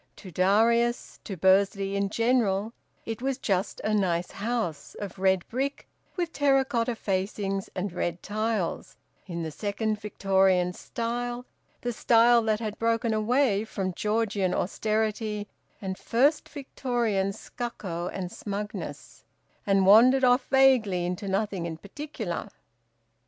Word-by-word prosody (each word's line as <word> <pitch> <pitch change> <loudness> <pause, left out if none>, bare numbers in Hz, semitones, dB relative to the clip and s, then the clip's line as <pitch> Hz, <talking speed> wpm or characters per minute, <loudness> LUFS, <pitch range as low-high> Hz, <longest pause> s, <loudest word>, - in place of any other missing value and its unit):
To 190 - -11
Darius, 230 +7 +2
to 195 - -5
Bursley 195 +2 +3
in 200 0 0
general, 230 -2 +1 0.3
it 225 0 -5
was 270 0 -1
just 195 -5 -1
a 215 - -1
nice 180 -4 0
house, 210 -7 -3
of 200 -2 -7
red 190 -1 +2
brick 270 +4 -3 0.3
with 345 -3 -2
terra 275 -2 +3
cotta 240 -2 -1
facings 195 -1 -2
and 185 -1 -3
red 175 -1 -3
tiles, 215 -3 -2 0.3
in 170 -2 -4
the 160 - -4
second 210 +4 -2
Victorian 190 -3 +2
Style, 240 +4 -4 0.4
the 245 0 -2
style 235 +1 +5
that 215 -1 0
had 215 -2 -5
broken 230 0 +1
away 215 -1 +2
from 195 -4 -3
Georgian 210 -2 0
austerity 215 +1 -1 0.3
and 190 -3 -5
first 280 +6 +2
Victorian 240 -8 -1
stucco 195 -6 -5
and 180 -1 -5
smugness, 205 0 -6 0.4
and 195 -1 +4
wandered 245 +7 +7
off 250 +1 +4
vaguely 250 -10 +4
into 180 +3 -3
nothing 195 -3 -1
in 160 -1 -6
particular. 290 - -6
210 Hz, 130 wpm, -27 LUFS, 190-235 Hz, 0.4 s, wandered